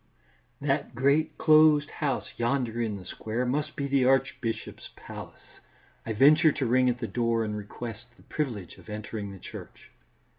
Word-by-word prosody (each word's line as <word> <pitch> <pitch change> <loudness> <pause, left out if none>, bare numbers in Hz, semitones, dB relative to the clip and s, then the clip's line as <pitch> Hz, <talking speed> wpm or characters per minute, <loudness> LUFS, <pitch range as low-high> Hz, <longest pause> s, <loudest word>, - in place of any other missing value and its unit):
That - - -1
great, 145 +5 +2
closed 155 -1 +5
house 145 -3 -2
yonder 120 -1 -1
in 110 -3 -2
the 90 - -11
square 115 +7 -3
must 145 +4 -1
be 140 - -2
the 140 -1 +2
archbishop's 130 -2 0
palace. - - -11 0.5
I 110 - -1
venture 150 +7 +6
to 135 - -2
ring 125 +2 +3
at 125 - 0
the 120 -2 -4
door 115 -1 0
and 105 -1 -3
request 110 +2 -7
the - - -20
privilege 110 - -4
of 85 - -15
entering 105 -1 -5
the 100 - -9
church. - - -11
125 Hz, 160 wpm, -28 LUFS, 110-140 Hz, 0.5 s, venture